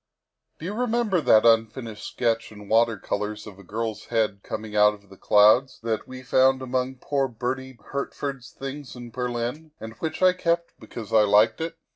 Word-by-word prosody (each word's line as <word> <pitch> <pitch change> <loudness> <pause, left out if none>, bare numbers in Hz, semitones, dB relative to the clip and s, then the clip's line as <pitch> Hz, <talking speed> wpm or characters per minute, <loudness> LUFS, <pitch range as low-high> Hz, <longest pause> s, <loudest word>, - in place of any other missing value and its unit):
" - - -55
Do 160 - -9
you 195 - -3
remember 230 -5 +1
that 110 -6 +5
unfinished 115 0 +1
sketch 115 -2 -1
in 105 -1 -12
water 115 0 +3
colors 105 +2 -4
of 100 -3 -11
a - - -13
girl's 110 +2 -4
head 110 -4 0
coming 110 0 -6
out 105 0 +5
of 100 -2 -18
clouds 110 +6 +4
that 110 -2 -2
we 130 0 -9
found 130 +1 +3
among 130 0 -2
poor 135 +1 -1
Bertie 130 +2 -4
Hertford's 140 -2 -4
things 135 0 -8
in 120 -1 -9
Berlin, 125 +5 -4
and 110 0 -8
which 160 +2 -3
I 185 0 +6
kept 170 -1 -1
because 110 -4 -9
I 110 - +7
liked 105 +5 +4
it? 165 +1 -4
120 Hz, 180 wpm, -25 LUFS, 110-135 Hz, -, I